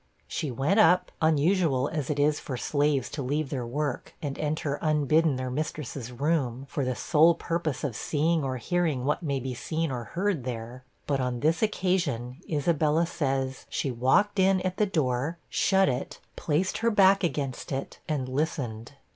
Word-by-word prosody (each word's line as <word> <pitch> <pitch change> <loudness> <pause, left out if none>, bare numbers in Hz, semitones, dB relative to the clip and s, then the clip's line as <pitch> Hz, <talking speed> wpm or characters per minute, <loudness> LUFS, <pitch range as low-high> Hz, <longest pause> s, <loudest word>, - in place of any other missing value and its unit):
She 150 - -3
went 140 - +1
up, 185 -4 +5
unusual 160 -3 +3
as 150 -4 -3
it 150 - -1
is 145 +1 +2
for 130 - -5
slaves 145 -1 +1
to 145 - -4
leave 140 +2 -1
their 125 -4 -3
work 145 +2 -3
and 140 -3 -4
enter 150 -1 -1
unbidden 155 0 +3
their 130 0 -3
mistress's 140 -3 -4
room, 135 -2 -1
for 140 +1 -2
the 130 -1 -1
sole 165 +4 +4
purpose 165 -3 -2
of 135 -7 -2
seeing 160 +6 +1
or 130 -1 -2
hearing 155 -1 0
what 150 +4 0
may 140 -5 -1
be 130 0 -4
seen 160 +5 -2
or 120 -2 -4
heard 185 -5 -1
there. 120 0 -6 0.2
But 140 -2 0
on 125 -2 -2
this 160 +2 +2
occasion, 175 - 0
Isabella 155 +1 +2
says, 135 -4 -2
she 135 - -1
walked 135 - +2
in 190 0 +4
at 185 0 -2
the 210 - +2
door, 150 -2 0
shut 195 0 +3
it, 125 0 -3 0.2
placed 165 +5 0
her 230 - +2
back 195 -2 +5
against 140 -6 -2
it, 135 0 -4
and 140 -4 -1
listened. 130 -4 -3
145 Hz, 170 wpm, -27 LUFS, 130-165 Hz, 0.2 s, up